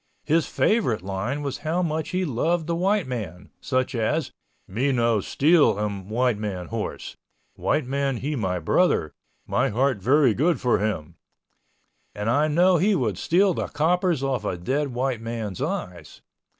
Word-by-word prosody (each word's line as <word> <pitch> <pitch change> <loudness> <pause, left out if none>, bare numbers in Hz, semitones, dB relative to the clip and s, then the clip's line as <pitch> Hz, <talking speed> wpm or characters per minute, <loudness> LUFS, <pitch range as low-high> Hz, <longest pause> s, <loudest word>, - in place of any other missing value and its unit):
His 160 +2 +2
favorite 125 - +1
line 100 +10 -3
was 140 0 -4
how 160 +4 -1
much 160 -2 -2
he 185 0 -1
loved 160 +5 0
the 170 - -1
white 195 +2 +1
man, 100 -7 -6
such 130 0 -1
as, 130 +6 -1 0.4
"Me 125 +9 0
no 115 -3 +2
steal 145 - +3
em 100 -2 -4
White 120 -1 +1
Man 95 -4 -4
horse—White 115 +5 -4
Man 135 0 -1
he 150 +5 -3
my 95 -7 -1
brother—My 85 - 0
heart 125 0 0
very 130 +2 +4
good 160 +9 +1
for 125 -2 +2
him" 100 -8 -3 1.0
(and 105 +2 -1
I 145 +5 +3
know 175 +4 +4
he 200 +5 +3
would 110 - -1
steal 185 +3 +3
the - - -3
coppers 170 0 +1
off 130 -5 -1
of 105 - -1
a - - -9
dead 135 +12 -1
white 125 -1 -2
man's 115 -5 -5
eyes). 85 -4 -5
130 Hz, 160 wpm, -24 LUFS, 105-155 Hz, 1.0 s, very